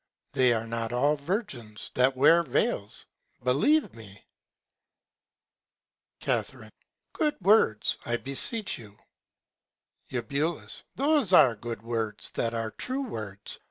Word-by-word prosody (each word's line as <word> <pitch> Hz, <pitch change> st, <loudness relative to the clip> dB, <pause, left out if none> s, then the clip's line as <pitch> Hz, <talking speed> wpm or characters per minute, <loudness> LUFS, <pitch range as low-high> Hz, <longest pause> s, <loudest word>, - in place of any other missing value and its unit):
They 130 Hz, -3 st, +4 dB
are 115 Hz, -1 st, 0 dB
not 115 Hz, 0 st, -3 dB
all 140 Hz, +5 st, +2 dB
Virgins 140 Hz, -, -5 dB
that 130 Hz, +1 st, +2 dB
wear 165 Hz, +6 st, +6 dB
Vails; 120 Hz, -8 st, -1 dB, 0.4 s
believe 150 Hz, -, +2 dB
me. -, -, -13 dB, 2.0 s
Ca. -, -, +1 dB, 0.7 s
Good 300 Hz, -2 st, 0 dB
Words, 185 Hz, -, +3 dB
I 120 Hz, 0 st, -1 dB
beseech 185 Hz, -, +1 dB
you. 105 Hz, -3 st, -14 dB, 1.1 s
Eu. 140 Hz, +6 st, -1 dB, 0.4 s
Those 280 Hz, -, +2 dB
are 135 Hz, -9 st, +7 dB
good 115 Hz, 0 st, -7 dB
Words 115 Hz, -3 st, -1 dB
that 115 Hz, 0 st, -1 dB
are 115 Hz, -1 st, -2 dB
true 260 Hz, -, -3 dB
Words. 105 Hz, -, -4 dB
130 Hz, 110 wpm, -27 LUFS, 115-175 Hz, 2.0 s, are